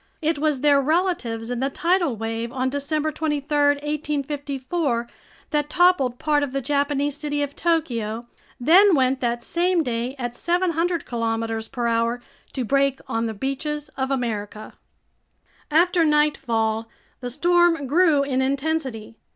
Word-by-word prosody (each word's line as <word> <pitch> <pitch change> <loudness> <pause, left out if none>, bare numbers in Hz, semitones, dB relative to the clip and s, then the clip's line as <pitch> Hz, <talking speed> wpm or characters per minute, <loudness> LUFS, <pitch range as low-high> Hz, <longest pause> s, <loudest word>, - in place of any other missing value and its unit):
It 315 -1 0
was 300 -3 0
their 285 -2 +4
relatives 275 -8 -1
in 245 - -2
the 270 +2 0
tidal 340 -2 +1
wave 225 +1 -3
on 260 +1 -1
December 300 +2 -1
23, 295 -1 -2 0.3
1854, 285 -3 -2 0.4
that 295 -1 0
toppled 350 -8 +3
part 300 +1 +1
of 280 -2 -3
the 275 - 0
Japanese 285 +1 0
city 290 -1 -2
of 285 0 -5
Tokyo, 235 -9 -1 0.3
then 355 +9 +6
went 260 -1 +2
that 240 -1 -1
same 350 +2 +1
day 245 0 -3
at 245 -2 -4
700 345 -1 0
kilometers 225 -1 -2
per 240 0 -4
hour 230 +1 +1 0.3
to 255 -3 -2
break 275 +2 +1
on 225 0 -1
the 220 - -5
beaches 280 +5 -3
of 265 0 -3
America. 215 -5 -3 1.0
After 340 +3 +3
nightfall 230 -8 +1 0.3
the 245 - -5
storm 345 +2 +3
grew 305 0 +3
in 265 -2 0
intensity. 265 -5 -2
280 Hz, 140 wpm, -23 LUFS, 240-310 Hz, 1.0 s, then